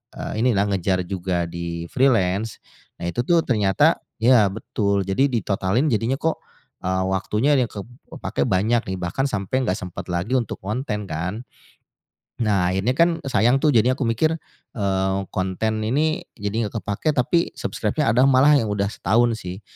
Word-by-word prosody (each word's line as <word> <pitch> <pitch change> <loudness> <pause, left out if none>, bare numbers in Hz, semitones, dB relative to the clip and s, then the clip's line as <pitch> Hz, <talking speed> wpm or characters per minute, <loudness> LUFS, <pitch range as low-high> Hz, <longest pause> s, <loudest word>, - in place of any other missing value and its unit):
eee, 110 +2 -3
inilah 105 -5 +2
ngejar 95 -1 0
juga 90 -2 -2
di 85 0 -5
freelance. 115 -6 +1 0.4
Nah 85 - -3
itu 120 +6 -2
tuh 170 +3 +3
ternyata 105 -6 +3 0.2
ya 115 -3 +5
betul. 100 -2 -1
Jadi 135 +8 +2
ditotalin 105 - 0
jadinya 115 +5 0
kok, 160 0 -1 0.4
eee, 95 0 0
waktunya 105 +9 +1
ada 130 - +3
yang - - -22
ke 105 - -6 0.4
kepake 70 - -2
banyak 110 +5 +2
nih 95 - -3
bahkan 90 +10 -1
sampai 125 +4 -1
enggak 95 -2 -1
sempat 90 -2 -7
lagi 90 +9 -1
untuk 120 -5 -1
konten 105 -1 -3
kan. 90 +9 -4 1.0
Nah 100 -5 +2
akhirnya 100 +7 0
kan 170 0 +3
sayang 130 0 +3
tuh. 150 - +4
Jadi 120 +3 +4
aku 140 - -6
mikir, 155 +8 +1 0.4
eee, 95 -2 0
konten 100 +4 -1
ini 155 +7 +1 0.2
jadi 105 +1 -2
enggak 110 +1 -5
kepake, 145 +10 -1
tapi 170 +7 +1
subscribe-nya 150 -7 -1
ada 125 +4 +4
malah 140 +2 +5
yang 115 - 0
udah 100 0 -1
setahun 115 +3 +1
sih. 90 +2 -7
110 Hz, 165 wpm, -22 LUFS, 95-125 Hz, 1.0 s, ya